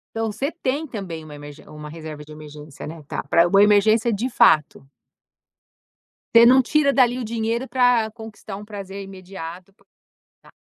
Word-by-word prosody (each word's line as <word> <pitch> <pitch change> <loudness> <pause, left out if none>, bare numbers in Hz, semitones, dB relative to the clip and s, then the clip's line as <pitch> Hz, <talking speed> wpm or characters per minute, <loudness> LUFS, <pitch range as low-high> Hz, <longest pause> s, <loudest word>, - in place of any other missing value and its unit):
Então 225 -1 -2
você 270 +8 -3
tem 295 -2 -3
também 190 - -7
uma 155 -1 -12
emerg 145 0 -11
uma 150 0 -10
reserva 155 -1 -9
de 150 - -16
emergência, 150 -1 -11
né, 160 +1 -9
tá. - - -4
Para 170 +5 +3
uma 195 +3 +5
emergência 215 +3 +3
de 230 +6 -2
fato. 155 - +3 1.5
Você 230 0 +9
não 260 +1 +6
tira 295 +2 +2
dali 250 -2 +2
o - - -4
dinheiro 230 +2 -2
pra 245 -3 +2
conquistar 220 -2 -10
um 205 - -10
prazer 200 -1 -8
imediato 185 -2 -10
pra 200 - -31 0.6
Tá. - - -20
205 Hz, 170 wpm, -22 LUFS, 160-235 Hz, 1.5 s, Você